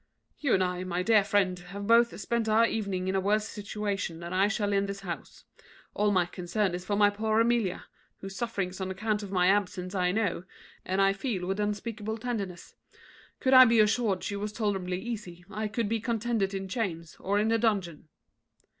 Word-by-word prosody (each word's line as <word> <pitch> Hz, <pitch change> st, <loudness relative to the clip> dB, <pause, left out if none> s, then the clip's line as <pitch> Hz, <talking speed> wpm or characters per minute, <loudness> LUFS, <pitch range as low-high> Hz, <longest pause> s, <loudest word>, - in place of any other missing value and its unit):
"You 280 Hz, -4 st, +2 dB
and 190 Hz, -, +2 dB
I, 180 Hz, 0 st, -2 dB
my 180 Hz, 0 st, -2 dB
dear 215 Hz, 0 st, +5 dB
friend, 195 Hz, -3 st, +1 dB
have 195 Hz, +3 st, -8 dB
both 235 Hz, +1 st, +4 dB
spent 225 Hz, +2 st, -1 dB
our 220 Hz, +2 st, +5 dB
evening 200 Hz, -5 st, -2 dB
in 190 Hz, -, 0 dB
a 195 Hz, -, +2 dB
worse 210 Hz, +3 st, +1 dB
situation 205 Hz, -5 st, -4 dB
than 170 Hz, +1 st, -6 dB
I 190 Hz, +2 st, +3 dB
shall 205 Hz, -1 st, -1 dB
in 200 Hz, 0 st, +1 dB
this 200 Hz, 0 st, -5 dB
house. 175 Hz, -3 st, -7 dB, 0.5 s
All 210 Hz, 0 st, +2 dB
my 185 Hz, -3 st, +3 dB
concern 180 Hz, +2 st, -2 dB
is 180 Hz, 0 st, -4 dB
for 205 Hz, +2 st, -1 dB
my 205 Hz, 0 st, +5 dB
poor 215 Hz, +1 st, 0 dB
Amelia, 230 Hz, -5 st, +1 dB, 0.3 s
whose 195 Hz, 0 st, -8 dB
sufferings 195 Hz, -5 st, -3 dB
on 190 Hz, -, -2 dB
account 210 Hz, +3 st, -1 dB
of 205 Hz, -, -7 dB
my 180 Hz, -2 st, +2 dB
absence 185 Hz, -1 st, +1 dB
I 180 Hz, -2 st, +1 dB
know, 200 Hz, -4 st, -1 dB, 0.4 s
and 190 Hz, +1 st, +1 dB
I 195 Hz, 0 st, +4 dB
feel 195 Hz, -3 st, -3 dB
with 195 Hz, +2 st, -2 dB
unspeakable 210 Hz, +1 st, -3 dB
tenderness. 205 Hz, -7 st, -5 dB, 0.7 s
Could 265 Hz, -1 st, +2 dB
I 255 Hz, 0 st, +11 dB
be 230 Hz, -1 st, +4 dB
assured 215 Hz, -2 st, +2 dB
she 200 Hz, -, -3 dB
was 205 Hz, +1 st, -3 dB
tolerably 195 Hz, -4 st, -2 dB
easy, 190 Hz, -6 st, -7 dB
I 215 Hz, +2 st, -2 dB
could 220 Hz, +1 st, -2 dB
be 225 Hz, +2 st, 0 dB
contented 225 Hz, -3 st, -1 dB
in 195 Hz, 0 st, -4 dB
chains 175 Hz, -6 st, -3 dB
or 200 Hz, +2 st, 0 dB
in 215 Hz, +2 st, +2 dB
a 230 Hz, -, +3 dB
dungeon." 195 Hz, -9 st, -1 dB
200 Hz, 200 wpm, -29 LUFS, 185-220 Hz, 0.7 s, I